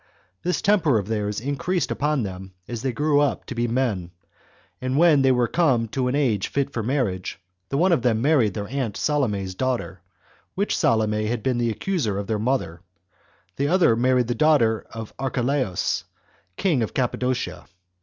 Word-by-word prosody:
This 180 Hz, +4 st, -1 dB
temper 190 Hz, -, +3 dB
of 100 Hz, -2 st, -2 dB
theirs 105 Hz, -2 st, -1 dB
increased 145 Hz, +8 st, -1 dB
upon 150 Hz, -3 st, 0 dB
them 95 Hz, -1 st, -7 dB
as 120 Hz, -2 st, -5 dB
they 130 Hz, -, -1 dB
grew 145 Hz, +3 st, +2 dB
up 145 Hz, -1 st, 0 dB
to -, -, -6 dB
be 120 Hz, 0 st, -1 dB
men; 115 Hz, -8 st, -1 dB, 0.7 s
and 130 Hz, +1 st, -1 dB
when 160 Hz, -3 st, +5 dB
they 135 Hz, -1 st, +4 dB
were 125 Hz, -1 st, +2 dB
Come 130 Hz, -9 st, +2 dB
to 130 Hz, +2 st, -1 dB
an 125 Hz, -, 0 dB
age 120 Hz, -10 st, +1 dB
fit 140 Hz, 0 st, -2 dB
for 115 Hz, -, -2 dB
marriage, 110 Hz, -8 st, -2 dB, 0.3 s
the 135 Hz, -, -1 dB
one 180 Hz, +5 st, +3 dB
of 165 Hz, -, +3 dB
them 115 Hz, -2 st, +2 dB
married 125 Hz, -, +2 dB
their 100 Hz, -1 st, -4 dB
aunt 125 Hz, -3 st, -3 dB
Salome's 105 Hz, -11 st, 0 dB
daughter, 120 Hz, -5 st, -2 dB, 0.5 s
which 200 Hz, +2 st, 0 dB
Salome 110 Hz, -1 st, +1 dB
had 115 Hz, 0 st, -2 dB
been 130 Hz, -2 st, 0 dB
the 120 Hz, -1 st, +1 dB
accuser 115 Hz, -, -1 dB
of 100 Hz, -, -3 dB
their 110 Hz, 0 st, -1 dB
mother; 105 Hz, -9 st, -1 dB, 0.8 s
the 140 Hz, -, +1 dB
other 175 Hz, -8 st, +4 dB
married 125 Hz, +1 st, +2 dB
the 120 Hz, -, -1 dB
daughter 120 Hz, -7 st, +2 dB
of 115 Hz, -1 st, -8 dB
Archelaus, 130 Hz, -5 st, -1 dB, 0.5 s
king 160 Hz, -10 st, +1 dB
of 110 Hz, -, -3 dB
Cappadocia. 125 Hz, -6 st, -2 dB
125 Hz, 175 wpm, -24 LUFS, 110-140 Hz, 0.8 s, when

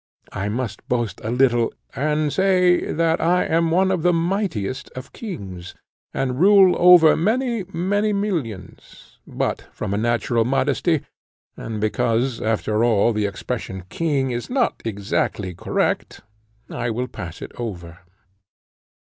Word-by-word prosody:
I 95 Hz, +2 st, -2 dB
might 115 Hz, -1 st, -3 dB
boast 120 Hz, -6 st, -2 dB
a 110 Hz, -, -3 dB
little 120 Hz, -1 st, +2 dB, 0.2 s
and 150 Hz, +2 st, 0 dB
say, 185 Hz, -2 st, +3 dB
that 165 Hz, +1 st, +1 dB
I 175 Hz, +2 st, +2 dB
am 165 Hz, +1 st, +1 dB
one 190 Hz, +3 st, +2 dB
of 185 Hz, -3 st, 0 dB
the 175 Hz, -, +3 dB
mightiest 165 Hz, -, -2 dB
of 130 Hz, +1 st, -9 dB
kings, 95 Hz, -, -8 dB, 0.4 s
and 130 Hz, -1 st, -2 dB
rule 190 Hz, 0 st, +6 dB
over 175 Hz, -3 st, +7 dB
many, 230 Hz, +3 st, 0 dB
many 205 Hz, +5 st, 0 dB
millions; 170 Hz, -, -5 dB
but -, -, -3 dB
from 95 Hz, -, -4 dB
a 100 Hz, -, 0 dB
natural 120 Hz, 0 st, +1 dB
modesty, 135 Hz, +5 st, +1 dB, 0.5 s
and 110 Hz, -2 st, -6 dB
because, 115 Hz, +3 st, 0 dB
after 110 Hz, 0 st, 0 dB
all, 115 Hz, -1 st, +3 dB
the 105 Hz, -1 st, 0 dB
expression, 95 Hz, -1 st, -5 dB
king, 140 Hz, -6 st, 0 dB
is 120 Hz, 0 st, -4 dB
not 250 Hz, -2 st, 0 dB
exactly 100 Hz, -2 st, -2 dB
correct, -, -, -2 dB, 0.5 s
I 120 Hz, -, -3 dB
will 125 Hz, +3 st, -2 dB
pass 90 Hz, -8 st, -8 dB
it -, -, -8 dB
over. 85 Hz, -7 st, -6 dB
130 Hz, 135 wpm, -22 LUFS, 110-175 Hz, 0.5 s, over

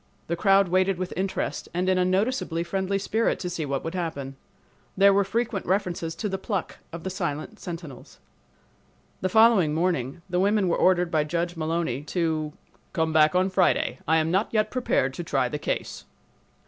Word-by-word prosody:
The 170 Hz, -, -2 dB
crowd 195 Hz, +1 st, +4 dB
waited 185 Hz, +1 st, +2 dB
with 185 Hz, 0 st, -4 dB
interest 190 Hz, +1 st, -3 dB
and 180 Hz, +1 st, 0 dB
in 185 Hz, -1 st, +3 dB
a -, -, +3 dB
noticeably 185 Hz, -2 st, 0 dB
friendly 190 Hz, +3 st, -1 dB
spirit 220 Hz, +3 st, 0 dB
to 180 Hz, -, -4 dB
see 160 Hz, -4 st, -3 dB
what 135 Hz, 0 st, -2 dB
would 165 Hz, -, -4 dB
happen. 155 Hz, -7 st, -4 dB, 0.6 s
There 200 Hz, +1 st, +6 dB
were 200 Hz, +1 st, +4 dB
frequent 225 Hz, 0 st, -2 dB
references 175 Hz, -4 st, -1 dB
to 210 Hz, -, -3 dB
the 190 Hz, -1 st, -3 dB
pluck 195 Hz, -2 st, -3 dB
of 170 Hz, -1 st, -7 dB
the 190 Hz, -, -3 dB
silent 175 Hz, +3 st, -4 dB
sentinels." 165 Hz, -7 st, -8 dB, 1.0 s
The 185 Hz, -, 0 dB
following 210 Hz, -7 st, +5 dB
morning 165 Hz, -3 st, -1 dB
the 180 Hz, -1 st, -1 dB
women 200 Hz, 0 st, +2 dB
were 170 Hz, -, +2 dB
ordered 180 Hz, -2 st, +3 dB
by 155 Hz, -2 st, +2 dB
Judge 170 Hz, +2 st, -2 dB
Mullowny 160 Hz, -5 st, -1 dB
to 160 Hz, -3 st, -1 dB, 0.4 s
"come 160 Hz, -3 st, 0 dB
back 155 Hz, +2 st, +4 dB
on 185 Hz, +1 st, +2 dB
Friday. 185 Hz, -1 st, +2 dB
I 160 Hz, -, +4 dB
am 160 Hz, 0 st, +1 dB
not 195 Hz, +4 st, +1 dB
yet 215 Hz, -1 st, +1 dB
prepared 245 Hz, -, 0 dB
to 175 Hz, -, -5 dB
try 135 Hz, -5 st, 0 dB
the 145 Hz, +4 st, -4 dB
case." -, -, -3 dB
180 Hz, 185 wpm, -25 LUFS, 160-195 Hz, 1.0 s, There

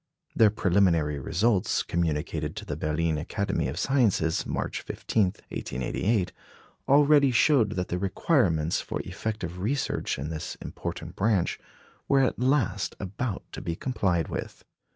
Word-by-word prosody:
Their 110 Hz, -2 st, +6 dB
preliminary 85 Hz, -7 st, +2 dB
results, 95 Hz, -, +1 dB
communicated 80 Hz, -2 st, -1 dB
to -, -, -6 dB
the 75 Hz, -, -3 dB
Berlin 75 Hz, +1 st, 0 dB
Academy 100 Hz, +2 st, -1 dB
of 70 Hz, +5 st, -4 dB
Sciences, 105 Hz, -, +2 dB
March -, -, -2 dB
15, 110 Hz, -3 st, 0 dB, 0.2 s
1888, 90 Hz, -, -1 dB, 0.6 s
already 145 Hz, 0 st, +6 dB
showed 120 Hz, -3 st, +4 dB
that 90 Hz, -3 st, -3 dB
the 90 Hz, -, -1 dB
requirements 90 Hz, -, +1 dB
for -, -, -4 dB
effective 95 Hz, -5 st, -5 dB
research 135 Hz, +9 st, -1 dB
in 70 Hz, +4 st, -4 dB
this 80 Hz, -1 st, -5 dB
important -, -, -6 dB
branch 100 Hz, -4 st, +1 dB, 0.5 s
were 135 Hz, -1 st, +4 dB
at 130 Hz, -, +1 dB
last 130 Hz, -3 st, +1 dB
about 100 Hz, +3 st, -3 dB
to -, -, -7 dB
be 85 Hz, -, -3 dB
complied 90 Hz, -8 st, 0 dB
with. -, -, -6 dB
95 Hz, 130 wpm, -27 LUFS, 80-115 Hz, 0.6 s, Their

